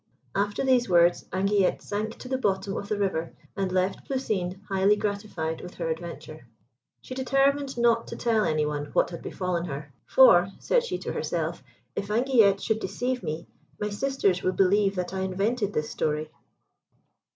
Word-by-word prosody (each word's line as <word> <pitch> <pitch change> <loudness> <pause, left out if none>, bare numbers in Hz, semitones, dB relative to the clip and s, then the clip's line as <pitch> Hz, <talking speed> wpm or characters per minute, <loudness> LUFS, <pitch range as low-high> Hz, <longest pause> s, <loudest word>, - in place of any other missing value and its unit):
After 205 +5 0
these 250 -4 +3
words, 175 -1 +4
Anguillette 195 0 +1
sank 215 +2 -3
to - - -9
the 260 0 -1
bottom 195 -3 0
of 200 - -5
the 210 - 0
river, 185 -5 -1 0.2
and 195 -2 -1
left 185 +1 -1
Plousine 200 -9 -2
highly 195 +1 +3
gratified 200 -6 -3
with 180 - -9
her 165 -2 -3
adventure. 160 -3 -6 0.6
She - - -7
determined 275 +1 +1
not 235 -1 +3
to - - -6
tell 225 -3 +1
any 155 -4 +1
one 145 -1 -2
what - - +2
had 170 - -7
befallen 180 -2 -2
her, 140 -2 -7
"For," 195 -8 +7
said - - +2
she, 480 - -3
to - - -5
herself, - - -2 0.3
"if 200 - -3
Anguillette 220 -4 +4
should 220 -1 0
deceive 245 +6 -2
me, 155 +2 -4 0.3
my 210 - -1
sisters 205 -5 +1
will 185 - 0
believe 195 +1 +3
that 180 0 -3
I 190 - -2
invented 200 +4 0
this 150 0 -2
story." 155 0 -1
195 Hz, 170 wpm, -27 LUFS, 175-230 Hz, 0.6 s, For